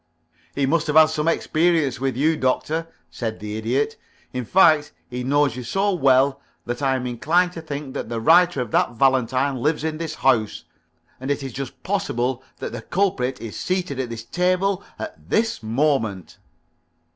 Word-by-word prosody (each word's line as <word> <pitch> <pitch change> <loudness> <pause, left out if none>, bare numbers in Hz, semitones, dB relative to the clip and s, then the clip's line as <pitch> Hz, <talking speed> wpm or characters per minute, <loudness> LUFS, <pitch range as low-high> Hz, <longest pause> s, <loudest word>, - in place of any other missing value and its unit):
"He 140 - +1
must 160 +3 +1
have 150 - -1
had 155 0 +7
some 155 0 -1
experience 160 -5 +1
with 130 -2 -1
you, 155 +4 +3
Doctor," 155 +4 -1 0.2
said 110 -2 -4
the 105 0 -5
Idiot. 130 - -1 0.4
"In 125 -1 -3
fact, 155 - +4
he 125 0 -5
knows 140 -1 +2
you 125 - -5
so 195 - 0
well 135 -3 +3 0.2
that 120 +3 -4
I 135 -1 +2
am 125 -1 -3
inclined 170 +9 +1
to 165 - -7
think 145 -3 -6
that - - -5
the 115 -1 -2
writer 170 +3 +4
of 120 -4 -5
that - - +2
valentine 130 +2 +2
lives 150 +5 0
in 160 -1 -2
this 165 -2 -4
house, 115 -6 +1 0.6
and 130 +2 -5
it 140 0 -1
is 135 - -6
just 135 -1 -7
possible 130 -11 -1 0.2
that - - -5
the 120 0 -6
culprit 135 - -1
is 115 -2 -7
seated 180 -7 -2
at 130 -2 -2
this 115 -1 -6
table 185 +6 0
at 320 - -8
this 225 - +1
moment." 115 - -1
140 Hz, 180 wpm, -22 LUFS, 125-165 Hz, 0.6 s, had